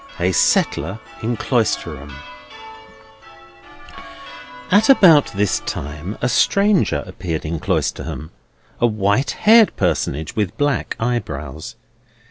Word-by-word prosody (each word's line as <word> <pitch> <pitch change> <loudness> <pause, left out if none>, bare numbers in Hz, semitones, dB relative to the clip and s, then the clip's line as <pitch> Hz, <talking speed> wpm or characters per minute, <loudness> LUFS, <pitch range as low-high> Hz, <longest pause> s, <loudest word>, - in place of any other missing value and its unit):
A 90 +1 +1
SETTLER 95 +2 +1 0.2
IN 115 +1 -2
CLOISTERHAM 85 - -2 2.6
At 210 +6 +4
about 170 - +6
this 100 -1 0
time 75 +8 -6
a - - +3
stranger 190 - +2
appeared 85 -4 -5
in 80 +1 -3
Cloisterham; 80 0 -3 0.5
a 120 - +3
white 105 +3 0 0.2
haired 225 0 +6
personage, 75 +3 -2
with 105 -1 -2
black 145 -3 -1
eyebrows. 80 - -4
105 Hz, 95 wpm, -19 LUFS, 80-130 Hz, 2.6 s, about